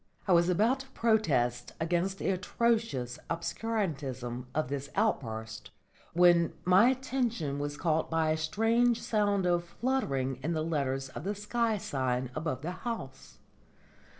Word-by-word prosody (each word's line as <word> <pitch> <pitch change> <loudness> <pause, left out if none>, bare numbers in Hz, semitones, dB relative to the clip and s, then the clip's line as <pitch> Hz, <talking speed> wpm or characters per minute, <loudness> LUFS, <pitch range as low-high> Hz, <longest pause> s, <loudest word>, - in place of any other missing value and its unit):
I - - +2
was 170 0 +5
about 220 +9 +3
to 270 - -9
protest 155 - +1
against 175 +4 0
the - - -1
atrocious 190 - 0
obscurantism 145 - -3
of 155 -3 +1
this 140 +1 -4
outburst, 110 - -2 0.4
when 175 -1 +5
my 185 +6 +6
attention 245 - -1
was 145 0 -3
caught 160 -1 0
by 160 -1 +1
a 155 - +1
strange 225 +9 +2
sound 205 -3 +1
of 175 -1 +2
fluttering 145 - -1
in 165 +4 -1
the 155 -1 -1
letters 135 -4 -1
of 140 - -8
the 200 +3 -2
sky 220 +2 0
sign 130 -7 -2
above 155 -4 -3
the 175 - -2
house. 220 - -6
170 Hz, 140 wpm, -30 LUFS, 135-220 Hz, 0.4 s, my